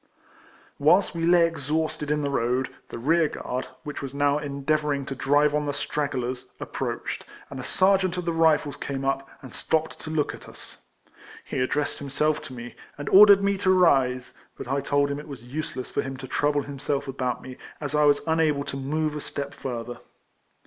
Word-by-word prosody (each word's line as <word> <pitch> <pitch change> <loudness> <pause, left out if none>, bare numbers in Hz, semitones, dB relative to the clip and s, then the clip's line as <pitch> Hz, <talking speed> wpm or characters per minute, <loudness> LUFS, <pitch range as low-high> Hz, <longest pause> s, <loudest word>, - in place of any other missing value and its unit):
A\'iiiLST 175 +7 +5
sve 165 -1 -2
Iny 175 -1 +6
exhausted 155 -1 -2
in 150 0 +1
tlic 140 - -1
road, 125 0 0 0.2
the - - -6
rear 160 +7 +3
guard, 125 +1 -4 0.2
whicli 150 - -5
was 140 -1 -6
now 145 +1 +2
endeavour 150 +1 -1
ing 140 -1 -4
to 140 - -4
drive 145 +2 +3
on 150 0 0
the 145 - -2
stragglers, 130 -4 -3
approached, - - -4 0.3
and 135 - -6
a - - -5
sergeaiit 185 +4 +2
of 180 - -3
the 170 - 0
Rifles 160 -3 +3
came 135 -1 -4
up, 135 0 -1
and 130 - -10
stopped 160 0 -1
to - - -8
look 155 -2 0
at - - -11
us. - - -13 0.7
He - - -3
addressed 145 +4 -1
him 140 - -5
self 150 +2 +1
to 135 - -9
me, 120 0 -8 0.2
and 145 -1 -4
ordered 200 0 +8
me 200 -1 +1
to 190 - +1
rise; 135 -9 +3 0.2
but - - -7
I 140 +2 0
told 140 +1 +1
him 140 - -3
it 150 - -10
was 135 -5 -9
useless 130 0 -5
for - - 0
him 135 0 -6
to 130 0 -8
trouble 145 +2 +1
himself 140 0 -3
about 130 -2 -2
me, 130 -1 -9 0.2
as 145 -1 -4
I 150 0 +4
was 145 -1 +4
unable 160 -3 +2
to 140 -1 -5
move 150 +3 -1
a 150 - -4
step 140 0 -5
further. 120 -2 -5
145 Hz, 200 wpm, -26 LUFS, 135-155 Hz, 0.7 s, ordered